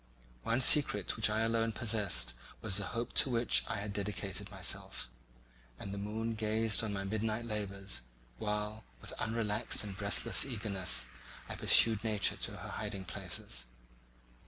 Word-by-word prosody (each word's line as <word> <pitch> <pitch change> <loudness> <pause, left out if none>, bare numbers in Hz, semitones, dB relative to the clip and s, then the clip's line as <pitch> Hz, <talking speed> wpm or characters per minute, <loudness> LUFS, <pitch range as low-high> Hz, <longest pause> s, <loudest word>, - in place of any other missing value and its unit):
One 115 +3 0
secret 125 -7 +6
which 110 -1 +5
I 110 +1 0
alone 115 0 0
possessed 100 - +1 0.3
was 100 -4 +1
the 100 - 0
hope 120 +1 -3
to - - +5
which 120 -1 +2
I - - -2
had 100 0 -5
dedicated 100 -1 -3
myself; 95 -9 0 0.7
and 100 - -7
the 100 - -4
moon 110 +3 -3
gazed 110 0 +1
on 110 - -2
my 100 -1 -3
midnight 110 +3 -2
labours, 100 - -2 0.4
while, 105 0 -3 0.2
with - - -9
unrelaxed 110 -2 0
and 100 -2 -6
breathless 105 +3 +1
eagerness, 105 -8 -1 0.4
I - - -6
pursued 110 -2 +4
nature 105 -3 +2
to - - -5
her - - -8
hiding 100 -3 -5
places. - - -6
105 Hz, 150 wpm, -33 LUFS, 100-115 Hz, 0.7 s, secret